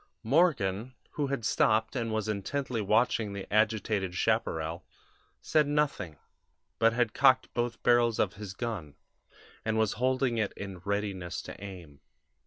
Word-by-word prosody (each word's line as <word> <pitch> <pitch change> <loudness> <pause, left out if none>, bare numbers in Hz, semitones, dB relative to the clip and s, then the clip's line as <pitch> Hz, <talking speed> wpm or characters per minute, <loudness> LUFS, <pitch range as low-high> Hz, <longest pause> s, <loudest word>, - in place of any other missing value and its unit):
"Morgan, 125 - +2 0.2
who 145 -2 -1
had 135 -5 -3
stopped 110 +2 +2
and 115 -3 -1
was 110 0 -1
intently 115 +4 -2
watching 110 0 +2
the 100 -1 -5
agitated 105 -3 +1
chaparral, 80 0 0 0.6
said 150 -2 +2
nothing, 145 - 0 0.6
but 115 0 +5
had 115 -2 0
cocked 130 -1 +4
both 120 -1 -2
barrels 120 -2 +4
of 95 - +1
his 100 -1 -8
gun, 100 -12 -4 0.7
and 110 0 0
was 110 -2 +2
holding 130 -2 +1
it 105 -2 -1
in 95 -2 -7
readiness 100 -2 -3
to - - -9
aim. 85 -8 -10
110 Hz, 140 wpm, -30 LUFS, 95-120 Hz, 0.7 s, but